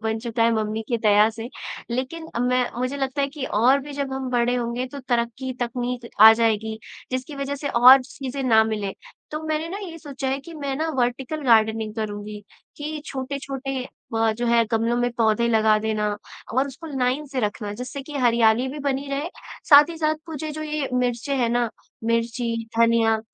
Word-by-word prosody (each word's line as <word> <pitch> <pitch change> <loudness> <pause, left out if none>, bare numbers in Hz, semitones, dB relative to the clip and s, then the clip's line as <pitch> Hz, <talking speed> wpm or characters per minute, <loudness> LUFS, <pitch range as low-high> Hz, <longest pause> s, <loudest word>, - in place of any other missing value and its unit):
बन 220 0 -1
चुका 230 0 -1
है 230 0 +4
मम्मी 220 0 -1
की 235 - +1
दया 210 0 +5
से। 225 +2 -7 0.4
लेकिन 265 +7 -3
अब 235 - 0
मैं 250 0 +2
मुझे 255 +3 -1
लगता 270 +1 -2
है - - +2
कि 280 -1 -6
और 250 +6 +3
भी 290 +2 -9
जब 280 -1 -3
हम 265 -1 -3
बड़े 245 0 +2
होंगे 245 +1 -2
तो 280 - -6
तरक्की, 240 +2 -1
तकनीक 245 0 -3
आ 220 +1 +11
जाएगी, 220 -1 0 0.3
जिसकी 255 +3 -4
वजह 275 0 -3
से 285 +1 -4
और 255 +1 +8
चीज़ें 270 +1 -6
ना 225 -4 +5
मिले। 210 -3 -2 0.4
तो 305 +1 -4
मैंने 310 +1 -1
ना 385 +4 -5
ये 345 -5 -7
सोचा 275 -3 -5
है 265 +1 0
कि 335 +4 -11
मैं 280 -3 -3
ना 320 +3 -1
वर्टीकल 250 +5 -1
गार्डनिंग 220 -2 +3
करुँगी 210 -1 -5 0.4
कि 300 +1 -5
छोटे-छोटे 270 -1 -4
अ, 225 -3 -2
जो 240 +2 -3
है 235 0 +4
गमलों 230 +2 +1
में 245 0 +1
पौधे 230 +1 +2
लगा 220 -1 +4
देना 215 -1 -1 0.4
और 265 +3 +2
उसको 280 +4 -9
लाइन 255 +4 0
से 265 -2 -3
रखना 210 -1 -2
जिससे 250 +4 -6
कि 295 +2 -7
हरियाली 235 0 +3
भी 285 +3 -6
बनी 280 0 -2
रहे, 285 +4 -2 0.4
साथ 290 0 +9
ही 330 - -7
साथ 310 -1 +2
मुझे 310 -1 -5
जो 310 +1 -5
ये 300 -2 -2
मिर्चें 250 +2 0
हैं 240 -3 +1
ना, 240 0 +1 0.4
मिर्ची, 230 +1 0 0.2
धनिया 230 -1 +4
250 Hz, 195 wpm, -23 LUFS, 225-275 Hz, 0.4 s, आ